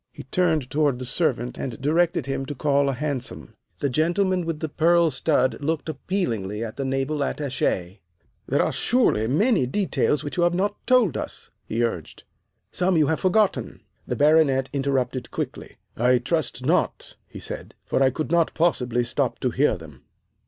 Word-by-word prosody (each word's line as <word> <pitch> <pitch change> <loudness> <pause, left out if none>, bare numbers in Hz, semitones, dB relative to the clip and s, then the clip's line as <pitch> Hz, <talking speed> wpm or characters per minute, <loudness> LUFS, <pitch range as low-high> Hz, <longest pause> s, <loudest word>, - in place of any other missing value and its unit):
He - - -10
turned 155 -3 0
toward 145 -3 +2
the 130 - -6
servant 125 -3 -1
and 125 -4 -5
directed 160 +1 +1
him 135 0 -3
to 145 - -5
call 140 0 +2
a - - 0
hansom. 135 -2 -4 0.3
The 140 - +1
gentleman 175 +4 +1
with 165 -2 -2
the 160 - -2
pearl 170 +2 +3
stud 130 -1 +1
looked 160 +2 -2
appealingly 115 - -2
at 110 -1 -6
the 140 - -3
Naval 135 +2 -1
Attache. 115 -10 -2 0.5
"There - - +2
are - - 0
surely 225 - +2
many 175 - +2
details 155 -2 0
that 145 +1 -6
you - - +2
have 175 0 +3
not 205 +3 0
told 245 - +4
us," - - -6 0.2
he 115 +2 0
urged. 90 -9 -4 0.5
"Some 180 -1 +1
you 155 - +4
have 160 - 0
forgotten." 200 +2 +1 0.3
The - - -2
Baronet 145 -3 +3
interrupted 135 -3 -1
quickly. - - -6 0.2
"I 125 +2 +3
trust 155 +6 -2
not," - - 0
he - - -10
said, - - -7
"for - - 0
I 135 - +5
could 155 +5 -4
not 170 -1 +2
possibly 125 -8 +1
stop 125 +1 -1
to 125 - 0
hear 130 -3 +2
them." 75 -6 -13
140 Hz, 175 wpm, -24 LUFS, 125-165 Hz, 0.5 s, I